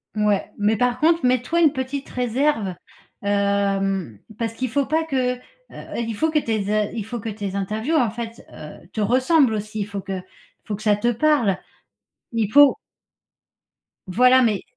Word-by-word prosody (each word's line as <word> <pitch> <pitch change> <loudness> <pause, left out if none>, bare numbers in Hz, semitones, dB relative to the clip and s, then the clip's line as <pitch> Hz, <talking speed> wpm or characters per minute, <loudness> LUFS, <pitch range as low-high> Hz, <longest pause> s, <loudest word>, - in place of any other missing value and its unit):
Mouais. 210 -2 +1
Mais 210 +2 +2
par 245 +2 +1
contre, 330 -1 +3
mets 250 -1 +3
toi 335 +7 0
une 315 -3 +6
petite 265 +1 -4
réserve, 245 -5 0 0.5
hem, 195 - 0 0.2
parce 225 -1 -2
qu'il 255 +2 -3
faut 280 +4 +1
pas 320 +3 0
que, 255 -4 0
heu, - - -18 0.6
il 230 -1 -2
faut 315 +9 0
que 310 - +3
tes 215 -6 -2
a 215 -1 +1
il 220 -3 -5
faut 240 +2 -5
que 225 - -4
tes 200 -2 -5
interviews, 215 +10 -1
en 245 -8 +2
fait, 230 0 -7
heu, 150 +2 -11
te - - -5
ressemblent 255 +4 +3
aussi. 215 +1 -4
Il 205 - -2
faut 200 -1 -5
que 195 0 -6
il 185 - -4 0.5
faut 210 - -2
que 210 - -10
ça 210 -1 +3
te 235 - -1
parle. 240 -6 +2 0.8
Il 220 -3 -1
faut 290 -1 +7 1.3
Voilà, 250 +7 +5
mais 215 -6 +1
225 Hz, 185 wpm, -22 LUFS, 205-260 Hz, 1.3 s, faut